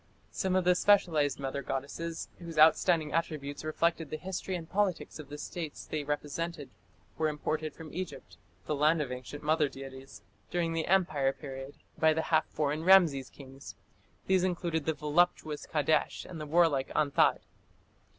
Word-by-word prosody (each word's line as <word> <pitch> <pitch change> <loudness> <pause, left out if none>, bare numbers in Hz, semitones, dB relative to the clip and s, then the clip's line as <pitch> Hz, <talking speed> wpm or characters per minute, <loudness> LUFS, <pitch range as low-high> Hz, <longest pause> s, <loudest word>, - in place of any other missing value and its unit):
Some 190 -1 -1
of 185 - +3
the 180 +1 +5
specialized 170 -8 +3
mother 135 0 -3
goddesses, 140 +5 -4
whose 170 -2 -8
outstanding 160 0 +5
attributes 155 -4 -2
reflected 160 0 0
the 155 - -4
history 190 +1 -4
and 165 -2 -6
politics 190 -3 -1
of 145 -3 -9
the 145 - -7
states 160 0 -6
they 155 -1 -3
represented, 150 +1 -4 0.5
were 160 - +2
imported 155 +1 -2
into 160 -2 -9
Egypt 185 +1 -6 0.3
the - - -1
land 155 +3 +3
of 140 -4 -2
ancient 130 +4 -7
mother 155 -1 +2
deities 135 -5 -10 0.3
during 170 -2 -1
the 165 -1 -1
Empire 165 -8 +2
period, 135 -1 -8 0.2
by 160 0 +5
the 160 +1 -1
half 160 - +4
foreign 150 +1 -1
Rameses 165 -8 +5
kings; 135 -1 -12 0.5
these 185 -1 +3
included 170 -4 -1
the 160 - 0
voluptuous 155 -1 +1
Kadesh 155 0 +1
and 165 -3 -8
the 150 - -5
warlike 155 -4 +3
Anthat. 145 -2 +3
155 Hz, 160 wpm, -30 LUFS, 145-170 Hz, 0.5 s, the